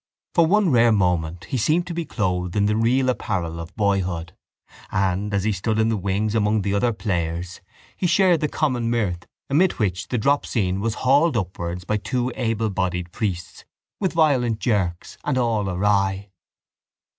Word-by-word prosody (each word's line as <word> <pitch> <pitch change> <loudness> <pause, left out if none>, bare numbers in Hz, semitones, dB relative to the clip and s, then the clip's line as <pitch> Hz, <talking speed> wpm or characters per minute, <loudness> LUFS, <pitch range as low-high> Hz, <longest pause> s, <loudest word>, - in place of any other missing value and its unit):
For 170 -2 +4
one 200 -1 +3
rare 120 -2 +5
moment 90 -4 0
he 135 - -3
seemed 155 +9 +2
to 180 - -5
be 170 0 -3
clothed 90 -7 -2
in 100 -1 +2
the 105 +1 +1
real 125 +4 +2
apparel 85 -9 -2
of 85 +2 -9
boyhood: 95 -5 -1 0.6
and, 95 +2 0
as 100 -2 0
he 110 - +1
stood 105 +3 -1
in 110 0 +2
the 115 - +1
wings 100 +2 -1
among 105 -1 +1
the 100 0 -1
other 120 +4 +2
players, 90 -4 -3 0.3
he 180 - 0
shared 175 0 +4
the 150 - 0
common 130 -7 -1
mirth 100 -7 -1 0.2
amid 170 +7 +3
which 95 -4 -2
the 125 - -1
drop 140 +6 +2
scene 95 -5 -1
was 110 0 -1
hauled 140 +2 +4
upwards 90 -2 -4
by 105 +3 0
two 120 +4 -2
ablebodied 100 -7 -1
priests 90 -6 -4 0.4
with 190 -3 -1
violent 135 -9 +2
jerks 95 -8 -2
and 145 -3 0
all 115 -5 +1
awry. 95 +1 0
105 Hz, 170 wpm, -23 LUFS, 90-125 Hz, 0.6 s, rare